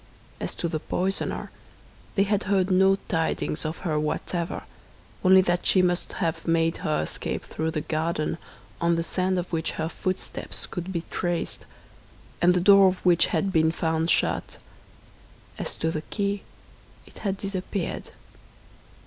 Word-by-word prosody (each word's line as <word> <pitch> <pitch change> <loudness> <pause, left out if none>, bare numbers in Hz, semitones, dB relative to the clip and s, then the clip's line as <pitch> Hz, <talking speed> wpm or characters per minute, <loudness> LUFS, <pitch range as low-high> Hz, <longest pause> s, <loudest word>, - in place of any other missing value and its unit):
As - - -4
to 170 - -1
the 160 -1 -2
poisoner, 190 +5 -2 0.6
they 195 - +4
had 205 +1 0
heard 190 -1 +2
no 190 +1 +5
tidings 160 -2 -1
of 155 +1 -2
her 155 -3 +1
whatever, 165 +3 -2 0.6
only 190 0 +8
that 175 -1 0
she 185 - +5
must 175 0 0
have 165 -3 -2
made 165 0 +2
her 155 - 0
escape - - -4
through 160 +1 -2
the 155 -1 -2
garden, 160 +1 -1 0.4
on 170 0 +3
the 165 - 0
sand 185 +2 +1
of 180 0 -3
which 160 0 0
her 160 - -2
footsteps 185 +2 -4
could 175 +1 -5
be 170 -3 -1
traced, 175 -2 -2 0.7
and 180 +1 +5
the - - +3
door 195 +1 +7
of 185 0 +1
which 175 -2 +5
had 190 +3 0
been 160 0 +4
found 160 0 0
shut. - - +1 1.0
As - - -3
to 160 - -1
the 155 - -2
key, 200 +3 -2 0.6
it - - -15
had 195 -2 -1
disappeared. 195 -1 -3
175 Hz, 155 wpm, -26 LUFS, 160-190 Hz, 1.0 s, only